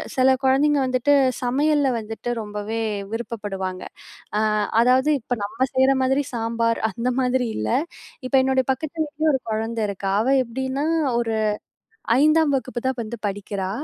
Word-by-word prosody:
சில 255 Hz, 0 st, +4 dB, 0.2 s
கொழந்தைங்க 280 Hz, +2 st, +3 dB
வந்துட்டு, 255 Hz, +2 st, +2 dB, 0.3 s
சமையல்ல 285 Hz, +3 st, +2 dB
வந்துட்டு 225 Hz, +2 st, -6 dB
ரொம்பவே 210 Hz, +1 st, -4 dB, 0.3 s
விருப்பப்படுவாங்க. 205 Hz, -5 st, -4 dB, 0.5 s
அ -, -, +2 dB, 0.4 s
அதாவது 255 Hz, +4 st, +4 dB
இப்ப 235 Hz, -, -3 dB
நம்ம 255 Hz, +6 st, -1 dB
செய்ற 265 Hz, +1 st, +5 dB
மாதிரி 265 Hz, +2 st, +2 dB
சாம்பார் 230 Hz, 0 st, 0 dB
அந்த 240 Hz, +1 st, -2 dB
மாதிரி 255 Hz, 0 st, +1 dB
இல்ல. 110 Hz, 0 st, -2 dB, 0.6 s
இப்போ 255 Hz, -, 0 dB
என்னோட 265 Hz, 0 st, +2 dB
பக்கத்து 310 Hz, +5 st, -4 dB
வீட்ல 300 Hz, +1 st, -4 dB
ஒரு 265 Hz, -, +1 dB
கொழந்த 225 Hz, +1 st, -2 dB
இருக்கா. 195 Hz, -1 st, -3 dB
அவ 230 Hz, -, -1 dB, 0.2 s
எப்டின்னா, 265 Hz, +4 st, -3 dB, 0.3 s
ஒரு 225 Hz, -2 st, -1 dB, 0.9 s
5ஆம் 310 Hz, 0 st, +4 dB
வகுப்பு 255 Hz, -2 st, -3 dB
தான் 260 Hz, -1 st, -1 dB
வந்து 230 Hz, +1 st, -6 dB
படிக்கிறா. 195 Hz, -1 st, -4 dB
245 Hz, 140 wpm, -23 LUFS, 225-265 Hz, 0.9 s, செய்ற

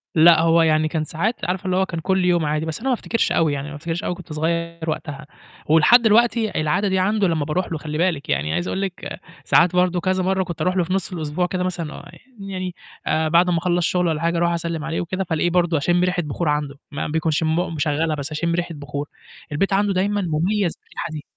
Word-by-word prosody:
لأ، 165 Hz, 0 st, +7 dB
هو 165 Hz, 0 st, +4 dB
يعني 155 Hz, -1 st, +3 dB
كان 155 Hz, 0 st, -2 dB
ساعات 195 Hz, +10 st, -2 dB
عارفة 185 Hz, +2 st, -2 dB
اللي 185 Hz, -, 0 dB
هو 190 Hz, -, +3 dB
كان 170 Hz, -3 st, -5 dB
كل 190 Hz, +2 st, +1 dB
يوم 175 Hz, -3 st, +2 dB
عادي، 150 Hz, +1 st, -1 dB
بس 160 Hz, -1 st, -4 dB
أنا 265 Hz, -, -4 dB
ما 255 Hz, -, +3 dB
أفتكرش 230 Hz, -1 st, -1 dB
أوي 160 Hz, -3 st, +2 dB
يعني 140 Hz, +1 st, -4 dB
ما 150 Hz, -, -8 dB
أفتكرش 165 Hz, +3 st, -4 dB
أوي 180 Hz, -, -2 dB
كنت 175 Hz, -3 st, -10 dB
صغيّر 170 Hz, +1 st, -2 dB
وقتها 150 Hz, -2 st, -5 dB, 0.4 s
ولحد 165 Hz, +11 st, +5 dB
الوقتي 225 Hz, -3 st, +3 dB
العادة 155 Hz, +7 st, +1 dB
دي 190 Hz, -1 st, +1 dB
عنده 205 Hz, +1 st, +2 dB
لمّا 160 Hz, -4 st, 0 dB
باروح 170 Hz, +5 st, -2 dB
له 165 Hz, -, -1 dB
خلّي 150 Hz, 0 st, -5 dB
باِلك، 170 Hz, -4 st, 0 dB
يعني 75 Hz, +2 st, 0 dB
عايز 85 Hz, +1 st, -1 dB
أقول 190 Hz, -, -2 dB
لِك 190 Hz, -2 st, -5 dB, 0.3 s
ساعات 175 Hz, +1 st, +4 dB
برضه 180 Hz, 0 st, +2 dB
كذا 185 Hz, +1 st, 0 dB
مرّة 190 Hz, +1 st, +1 dB
كنت 170 Hz, -2 st, -6 dB
أروح 185 Hz, 0 st, +1 dB
له 180 Hz, -, +3 dB
في 185 Hz, +2 st, -3 dB
نُص 195 Hz, -1 st, -1 dB
الأسبوع 160 Hz, +1 st, -1 dB
كده 180 Hz, 0 st, -2 dB
مثلًا 175 Hz, -4 st, -3 dB
ويع -, -, -10 dB, 0.4 s
يعني 185 Hz, -2 st, -5 dB, 0.3 s
آآ، 160 Hz, 0 st, +1 dB
بعد 170 Hz, +3 st, +4 dB
أمّا 175 Hz, -, +2 dB
أخلّص 175 Hz, 0 st, +1 dB
شُغل 180 Hz, +1 st, +1 dB
والّا 160 Hz, -1 st, -1 dB
حاجة 170 Hz, 0 st, +1 dB
أروح 170 Hz, 0 st, +2 dB
أسلّم 165 Hz, -2 st, -3 dB
عليه 165 Hz, -, -2 dB
وكده 185 Hz, +2 st, -2 dB
فألاقيه 170 Hz, -1 st, 0 dB
برضه 175 Hz, -2 st, +2 dB
أشِم 175 Hz, +5 st, +2 dB
ريحة 180 Hz, -1 st, +1 dB
بخور 150 Hz, +2 st, -2 dB
عنده 150 Hz, -1 st, -1 dB, 0.2 s
ما 145 Hz, -, -3 dB
بيكنش 160 Hz, 0 st, 0 dB
مو 160 Hz, +3 st, 0 dB
مشغّلها 155 Hz, 0 st, 0 dB
بس 145 Hz, +1 st, -5 dB
أشِم 170 Hz, +2 st, -1 dB
ريحة 175 Hz, -1 st, -3 dB
بخور، 145 Hz, 0 st, -5 dB, 0.4 s
البيت 195 Hz, +7 st, 0 dB
عنده 200 Hz, 0 st, +2 dB
دايمّا 200 Hz, +2 st, 0 dB
مُميز 180 Hz, +2 st, 0 dB
بالريحة -, -, -7 dB
دي. 150 Hz, -1 st, -6 dB
170 Hz, 235 wpm, -22 LUFS, 155-185 Hz, 0.4 s, لأ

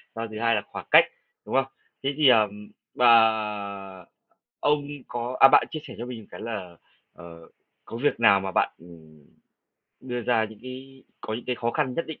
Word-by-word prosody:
A, 115 Hz, 0 st, -4 dB
thứ 110 Hz, -, -6 dB
hai 115 Hz, -1 st, +2 dB
là 105 Hz, -, 0 dB
khoảng -, -, -8 dB
cách, -, -, +8 dB, 0.4 s
đúng -, -, -4 dB
không? 135 Hz, -1 st, +3 dB, 0.4 s
Thế 135 Hz, -, +1 dB
thì, 150 Hz, -2 st, +4 dB
ờm, 105 Hz, -2 st, +2 dB, 0.3 s
ờ, 105 Hz, -5 st, +2 dB, 0.5 s
ông 145 Hz, -1 st, +1 dB, 0.2 s
có 120 Hz, +1 st, -4 dB
à, 135 Hz, -, +10 dB
bạn -, -, +5 dB
chia 155 Hz, -, -4 dB
sẻ 130 Hz, -6 st, -10 dB
cho 120 Hz, -, -6 dB
mình 125 Hz, -2 st, -7 dB
một 105 Hz, -, -17 dB
cái -, -, -10 dB
là, 95 Hz, -7 st, -6 dB, 0.4 s
ờ, 85 Hz, -1 st, -13 dB, 0.4 s
có 115 Hz, -, -5 dB
việc 145 Hz, -, +1 dB
nào 100 Hz, -4 st, +6 dB
mà 95 Hz, 0 st, -4 dB
bạn, -, -, +1 dB
ừm, 80 Hz, -3 st, -17 dB, 0.8 s
đưa 125 Hz, -1 st, -4 dB
ra 115 Hz, -1 st, +2 dB
những 110 Hz, -1 st, -10 dB
cái 130 Hz, +1 st, -10 dB, 0.2 s
có 110 Hz, -, -5 dB
những 115 Hz, -, -6 dB
cái 125 Hz, -, -2 dB
khó 120 Hz, 0 st, -1 dB
khăn 130 Hz, -2 st, -1 dB
nhất 165 Hz, -, -3 dB
định 160 Hz, -, -8 dB
115 Hz, 200 wpm, -25 LUFS, 100-125 Hz, 0.8 s, à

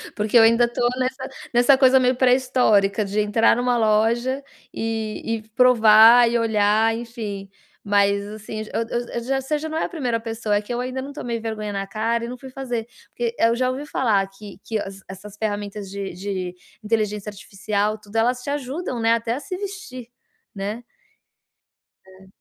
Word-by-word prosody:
porque 210 Hz, +2 st, -2 dB
eu -, -, +8 dB
ainda 230 Hz, +2 st, +5 dB
tô 240 Hz, -, -5 dB, 0.2 s
nessa 260 Hz, +1 st, -3 dB, 0.2 s
nessa 245 Hz, +3 st, +5 dB
coisa 265 Hz, 0 st, +6 dB
meio 255 Hz, 0 st, +2 dB
pré-histórica 250 Hz, -5 st, +3 dB
de 200 Hz, +2 st, -2 dB
entrar 210 Hz, +2 st, +3 dB
em -, -, -1 dB
uma 245 Hz, -1 st, +1 dB
loja, 230 Hz, +5 st, +1 dB, 0.3 s
e 225 Hz, -1 st, -3 dB
e 225 Hz, -1 st, -2 dB
provar 230 Hz, 0 st, +7 dB
e 235 Hz, 0 st, +1 dB
olhar, 220 Hz, 0 st, +2 dB
enfim, 225 Hz, -4 st, -6 dB, 0.4 s
mas 200 Hz, 0 st, +2 dB
assim, 215 Hz, +1 st, -7 dB
eu -, -, 0 dB
eu 240 Hz, -, -1 dB
eu 235 Hz, -, -4 dB
já 270 Hz, +2 st, 0 dB
você 295 Hz, +3 st, -2 dB
já 315 Hz, +1 st, -5 dB
não 315 Hz, -, -3 dB
é -, -, 0 dB
a -, -, -5 dB
1º 250 Hz, -9 st, -2 dB
pessoa, 225 Hz, -2 st, -2 dB
é 205 Hz, -, +1 dB
que 210 Hz, +3 st, -6 dB
eu 240 Hz, -, -2 dB
ainda 255 Hz, +1 st, -3 dB
não 280 Hz, +1 st, -8 dB
tomei 240 Hz, -5 st, -4 dB
vergonha 220 Hz, -2 st, -4 dB
na 195 Hz, -1 st, -3 dB
cara 230 Hz, +3 st, -1 dB
e -, -, -6 dB
não 250 Hz, +1 st, -7 dB
fui 265 Hz, +1 st, -11 dB
fazer, 245 Hz, -4 st, -4 dB, 0.2 s
porque 235 Hz, -1 st, -3 dB
eu 230 Hz, +1 st, +3 dB
já 255 Hz, +1 st, +1 dB
ouvi 265 Hz, +3 st, -4 dB
falar 215 Hz, -9 st, +1 dB
que 200 Hz, +1 st, -12 dB
que 220 Hz, -1 st, -2 dB
as 195 Hz, -1 st, -7 dB
essas 195 Hz, +2 st, -11 dB
ferramentas 205 Hz, -1 st, -4 dB
de 195 Hz, -1 st, -6 dB
de 185 Hz, -1 st, -4 dB, 0.3 s
inteligência 210 Hz, -1 st, -1 dB
artificial, 210 Hz, +1 st, -3 dB
tudo 210 Hz, 0 st, -17 dB
elas 245 Hz, +3 st, +1 dB
te 265 Hz, -, -6 dB
ajudam, 285 Hz, -1 st, -3 dB
né, 225 Hz, 0 st, +3 dB
até 230 Hz, 0 st, -1 dB
a -, -, -4 dB
se 365 Hz, +5 st, -6 dB
vestir, 365 Hz, -, -7 dB, 0.5 s
né? 205 Hz, +4 st, -5 dB, 1.2 s
É. 190 Hz, 0 st, -17 dB
225 Hz, 190 wpm, -22 LUFS, 210-250 Hz, 1.2 s, eu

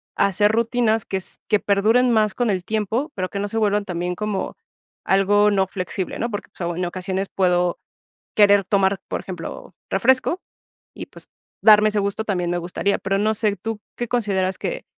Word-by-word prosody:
hacer 205 Hz, +2 st, +3 dB
rutinas 230 Hz, -1 st, +1 dB
que 190 Hz, -, -2 dB
s 185 Hz, -, -3 dB
que 210 Hz, -2 st, +3 dB
perduren 225 Hz, +5 st, +3 dB
más 215 Hz, -3 st, +2 dB
con 240 Hz, -3 st, 0 dB
el 185 Hz, -2 st, -2 dB
tiempo, 220 Hz, +7 st, -1 dB
pero 185 Hz, -1 st, -3 dB
que 200 Hz, -, -4 dB
no 205 Hz, -, -2 dB
se 225 Hz, -, -3 dB
vuelvan 205 Hz, -1 st, +1 dB
también 180 Hz, 0 st, -3 dB
como, 210 Hz, -1 st, -3 dB, 0.5 s
algo 205 Hz, +2 st, +3 dB
no 190 Hz, -2 st, +2 dB
flexible, 185 Hz, 0 st, -4 dB
¿no?, 235 Hz, -, -1 dB
porque, 205 Hz, -, -5 dB
pues, 175 Hz, -1 st, -3 dB
en 180 Hz, -, -1 dB
ocasiones 185 Hz, +2 st, -3 dB
puedo 180 Hz, -2 st, +1 dB, 0.6 s
querer 205 Hz, -2 st, +5 dB
tomar, 195 Hz, 0 st, +1 dB
por -, -, -3 dB
ejemplo, 180 Hz, -3 st, -8 dB, 0.2 s
refresco, 260 Hz, -, +2 dB, 0.6 s
y -, -, -7 dB
pues, -, -, -13 dB, 0.3 s
darme 215 Hz, 0 st, +7 dB
ese 210 Hz, 0 st, 0 dB
gusto 200 Hz, +2 st, -2 dB
también 180 Hz, -4 st, -1 dB
me 175 Hz, -, 0 dB
gustaría, 180 Hz, +3 st, -1 dB
pero 195 Hz, +1 st, -1 dB
no 215 Hz, +1 st, +2 dB
sé, 210 Hz, -2 st, +1 dB
¿tú 220 Hz, +3 st, -5 dB, 0.2 s
qué 240 Hz, -, -3 dB
consideras 195 Hz, -6 st, 0 dB
que -, -, -4 dB
200 Hz, 185 wpm, -22 LUFS, 190-215 Hz, 0.6 s, darme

